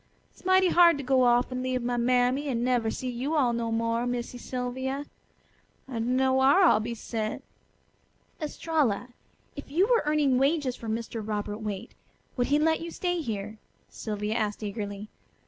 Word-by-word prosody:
"It's - - -22
mighty 375 0 +4
hard 345 -3 +6
to 280 - -5
go 260 -1 +3
off 245 +1 +3
and 255 0 -3
leave 255 -1 -1
my 245 0 -1
mammy 250 +3 +2
an' 240 -3 -1
never 245 -3 +1
see 255 - -4
you 260 +6 -2
all 255 -6 +3
no 230 -1 -2
more, 230 +1 0
Missy 245 0 -4
Sylvia. 260 +3 -3 0.8
I 250 -4 -4
dunno 255 +3 +2
whar 270 +8 +5
I'll 330 - +6
be 235 +2 -4
sent." 220 -1 -4 1.0
"Estralla, 295 -7 -1 0.5
if 285 - -9
you 340 +7 +3
were 470 +1 +3
earning 290 -4 +3
wages 275 -2 +1
for 230 - -7
Mr. 225 0 -3
Robert 210 0 -3
Waite 205 -3 -5 0.4
would 245 -2 0
he 290 - +3
let 320 +2 +2
you 335 - -5
stay 355 0 -2
here?" 215 -4 -5 0.3
Sylvia 210 -1 -4
asked 215 -2 -2
eagerly. 205 0 -5
250 Hz, 170 wpm, -27 LUFS, 225-285 Hz, 1.0 s, hard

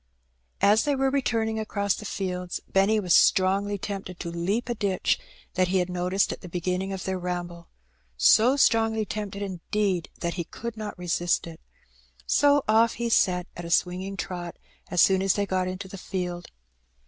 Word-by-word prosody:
As 210 +2 +5
they 290 -1 +1
were 270 0 +1
returning 225 -5 0
across 200 -2 -1
the 210 - -7
fields 180 -3 -3
Benny 195 +3 +3
was 180 -4 +1
stroDgly 200 +1 +3
tempted 190 -2 -6
to 170 - -5
leap 190 +8 -1
a 240 - -1
ditch 200 -4 0 0.3
that 185 0 +2
he 190 +1 +1
had 180 0 0
noticed 180 +2 0
at - - -7
the 180 - -9
beginning 180 +2 -2
of 190 -1 -4
their 190 -1 -2
ramble 175 -1 -5 0.3
— - - -41 0.2
so 245 +5 +4
strongly 225 -5 +3
tempted 205 -1 -5
indeed 190 -1 -2
that 170 0 -1
he 170 - -3
could 235 +5 -7
not 215 -3 -6
resist 175 0 0
it. 165 -1 -10 0.6
So 285 -1 +4
off 225 +2 +4
he 235 0 -2
set 180 -5 +2
at 175 - -7
a 170 - -6
swinging 185 +3 0
trot 175 -3 -5 0.3
as 180 - +2
soon 190 -1 +4
as 195 -1 +2
they 205 - 0
got 185 -1 -1
into 185 +1 -5
the 190 0 -9
field. 180 -2 -4
190 Hz, 185 wpm, -26 LUFS, 180-215 Hz, 0.6 s, As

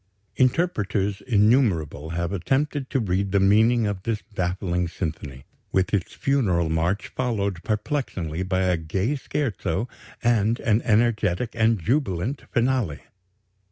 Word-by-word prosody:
Interpreters 105 - +1
innumerable 105 - +2
have 85 +2 -2
attempted 135 - -1
to 135 - 0
read 100 -2 -1
the 100 - +3
meaning 110 +4 +4
of 100 -2 -2
this 110 +1 -2
baffling 90 -1 -1
symphony, 75 -6 -5 0.3
with 95 +1 +1
its 100 -3 0
funeral 95 - +1
march 85 +5 0
followed 100 -8 -2
perplexingly 105 - -2
by 95 0 0
a 90 -2 +2
gay 95 - -1
scherzo 120 - -2 0.4
and 115 0 +2
an 115 -3 +2
energetic 110 -1 +2
and 115 -1 +2
jubilant 120 - -1
finale. 120 - 0
100 Hz, 120 wpm, -24 LUFS, 90-120 Hz, 0.4 s, meaning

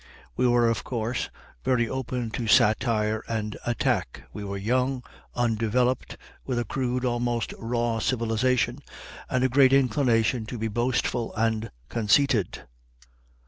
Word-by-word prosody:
We 125 - +2
were, 120 -1 +4
of 115 -6 0
course, 120 0 -2 0.3
very 120 - +2
open 125 -2 -3
to 115 0 -3
satire 110 0 +3
and 105 -2 -3
attack. 115 - -1
We 105 - -6
were 100 0 -4
young, 125 +5 0 0.3
undeveloped, 120 +2 0 0.3
with 130 -2 -2
a 120 - 0
crude, 125 +1 -1
almost 120 -1 -1
raw 115 0 -1
civilization, 120 +1 +1 0.5
and 125 0 +1
a - - +5
great 130 +1 +5
inclination 125 -3 +2
to 125 - -5
be 110 0 -2
boastful 120 +1 -1
and 110 -1 0 0.2
conceited. 115 -1 +2
120 Hz, 130 wpm, -26 LUFS, 110-125 Hz, 0.5 s, a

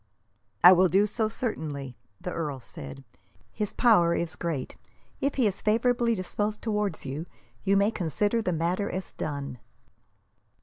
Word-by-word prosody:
"I 180 - +11
will 185 0 +6
do 195 +4 +4
so, 215 +1 0
certainly," 150 - -3 0.2
the 180 - -5
earl 150 -6 -3
said. 70 - -9 0.5
"His 210 -2 -3
power 175 -9 +4
is 170 -2 -2
great. 160 -7 -3 0.4
If 275 +1 0
he 260 - +2
is 195 -2 0
favourably 235 +2 +2
disposed 205 +3 -3
towards 210 -7 -1
you, 145 +6 -4 0.4
you 195 +1 +3
may 200 +2 +3
consider 205 - 0
the 185 - -1
matter 175 +5 0
as 185 0 -5
done." 140 -4 -5
185 Hz, 145 wpm, -27 LUFS, 160-215 Hz, 0.5 s, I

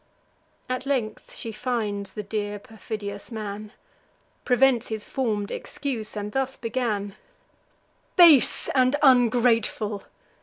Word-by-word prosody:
At 255 +1 -3
length 240 -6 -2
she 225 - -5
finds 215 -4 -3
the 210 - -4
dear 205 0 -3
perfidious 205 -1 -7
man; 210 -1 -6 0.7
Prevents 250 -1 +3
his 220 -1 -4
form'd 215 -6 -2
excuse, 230 -7 -4
and 205 0 -4
thus 265 +1 -2
began: 225 -4 -2 1.0
"Base 335 -8 +6
and 255 +1 +3
ungrateful! 230 -5 +3
225 Hz, 105 wpm, -25 LUFS, 210-255 Hz, 1.0 s, Base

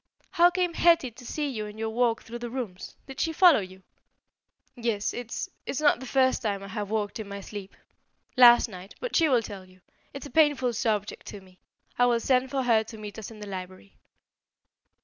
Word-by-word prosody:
How 350 -1 +5
came 355 -1 -1
Hetty 335 -7 +3
to 245 +2 -14
see 300 -1 -2
you 220 -6 -4
in 210 +1 -11
your 220 0 -3
walk 230 0 +1
through 240 +1 -8
the 240 0 -5
rooms? 230 -7 -6
Did 270 -1 -10
she 325 - 0
follow 345 -2 +6
you?" 190 -1 -9 0.9
"Yes. 230 -4 -2
It's 240 -1 -5 0.2
it's 275 - -2
not 295 -5 +3
the 260 - -8
first 260 0 +2
time 200 -4 -2
I 195 - -9
have 205 0 -4
walked 215 0 -2
in 215 - -6
my 200 0 -6
sleep. 200 0 -9 0.6
Last 240 -1 +8
night 190 -2 -11
but - - -4
she 325 -3 +4
will 245 -4 +3
tell 200 -3 -8
you. 185 0 -20 0.3
It's 275 - -8
a 285 - -10
painful 290 -6 +3
subject 215 -3 -2
to 205 - -8
me. 185 -1 -21 0.4
I 245 - +5
will 240 -1 +2
send 255 +2 +1
for 270 -1 -1
her 230 -3 +3
to 220 0 -10
meet 210 0 -8
us 220 - -7
in 220 -2 -12
the 210 - -7
library." 185 - -9
230 Hz, 210 wpm, -27 LUFS, 205-265 Hz, 0.9 s, Last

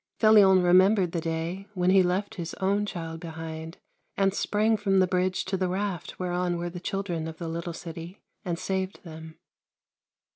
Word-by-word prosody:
Felion 200 -4 +6
remem 185 +4 +6
bered 180 -4 +1
the 170 - -2
day 165 +4 -3
when 180 0 +2
he 190 0 +6
left 185 +3 0
his 170 -3 -6
own 200 +2 0
child 165 -3 -5
behind 160 0 -7 0.4
and 195 -1 +2
sprang 215 +2 +1
from 200 -2 +1
the 185 - +5
bridge 185 0 0
to 190 +1 -1
the 185 0 0
raft 190 -2 -3
whereon 180 -1 -1
were 175 0 -4
the 175 - -7
children 180 -3 -3
of 160 0 -7
the 170 - -5
little 170 +1 -4
city, 165 +2 -8 0.2
and 175 -4 -2
saved 190 +2 -3
them. 160 -1 -10
180 Hz, 180 wpm, -27 LUFS, 165-195 Hz, 0.4 s, Felion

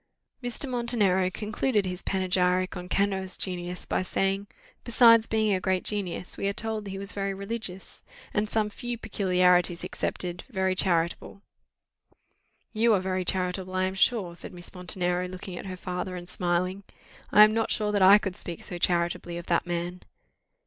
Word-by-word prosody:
Mr. 245 +3 -1
Montenero 225 -7 +2
concluded 210 +2 -1
his 180 0 -4
panegyric 185 -1 +1
on 180 0 -7
Cano's 190 -1 0
genius 180 -1 -4
by - - 0
saying, 195 +2 -1 0.4
"Besides 230 -1 +6
being 220 -2 +1
a 190 - +1
great 185 0 0
genius, 190 -4 -1
we 200 - 0
are 200 - 0
told 220 0 -3
that - - -6
he 195 - -5
was 200 +1 -4
very 195 -1 -2
religious, 200 -2 -5 0.3
and, 210 0 0
some 210 -1 0
few 240 +3 -5
peculiarities 180 -5 +2
excepted, 175 -1 -3
very 190 -5 0
charitable." 175 +2 -1 1.3
"You 225 0 +4
are - - +2
very 185 0 -1
charitable, 185 0 -2
I 185 - +1
am 185 0 -1
sure," 190 -3 +1
said - - -8
Miss 175 -1 -10
Montenero, 180 0 -1
looking 185 0 -8
at - - -8
her 185 -1 -6
father, 180 0 -4
and 175 -1 -8
smiling: 180 +2 -1 0.5
"I 210 - +9
am 215 0 +5
not 225 0 0
sure 210 -1 0
that 205 -1 +1
I 195 +2 +9
could 195 -3 -4
speak 170 -2 -1
so 180 -3 -5
charitably 175 0 0
of 175 - -7
that 170 0 +1
man." 175 +1 -3
190 Hz, 170 wpm, -27 LUFS, 180-210 Hz, 1.3 s, I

